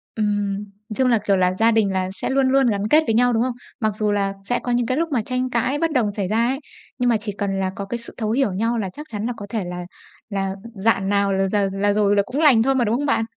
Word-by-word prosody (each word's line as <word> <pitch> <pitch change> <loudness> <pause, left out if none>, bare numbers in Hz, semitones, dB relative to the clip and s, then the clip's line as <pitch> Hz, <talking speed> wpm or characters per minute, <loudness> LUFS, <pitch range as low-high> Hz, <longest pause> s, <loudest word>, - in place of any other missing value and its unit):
Ừm. 205 -2 -1 0.3
Chung 260 -1 +2
là, 235 -2 +4
kiểu 200 -2 +3
là, 185 0 +2
gia 225 +1 +5
đình 215 -3 +2
là 185 0 -1
sẽ - - -4
luôn 265 -1 +2
luôn 270 0 +4
gắn 210 -2 0
kết 305 +6 +5
với 225 - +1
nhau, 245 +2 +4
đúng 225 +1 +2
không? 255 - 0 0.3
Mặc 215 -2 0
dù 210 -1 0
là 200 -1 0 0.2
sẽ 245 - +1
có 245 - -2
những 240 -1 +1
cái 255 - 0
lúc 330 +1 0
mà 235 -4 +1
tranh 255 +2 -2
cãi 255 +4 0
bất 330 +2 +1
đồng 225 -7 +1
xảy 195 -3 -1
ra 225 +3 +2
ấy, 265 +2 -1 0.4
nhưng 245 0 +1
mà 230 - +3
chỉ 210 -1 -4
cần 195 -1 -1
là 190 0 0
có 200 - -4
cái 235 +4 -4
sự 235 - -12
thấu 215 -2 -2
hiểu 245 -4 +1
nhau 230 +5 0
là 200 -4 -2
chắc 300 +1 -9
chắn 210 0 -3
là 245 - -1
có 205 - -8
thể 215 -3 -2
là 180 0 -5 0.5
là 195 -1 -2 0.2
rạn 195 -1 +1
nào 200 -1 +2
là 195 0 +1
rà 205 -2 +2
là 200 +1 +1
rồi 205 -1 +2
là 200 - +4
cũng 265 +4 -3
lành 270 -8 +6
thôi 270 +2 +2
mà, 250 -2 +2
đúng 225 +2 +1
không 290 +2 -2
bạn? 225 -5 +2
220 Hz, 295 wpm, -22 LUFS, 200-245 Hz, 0.5 s, lành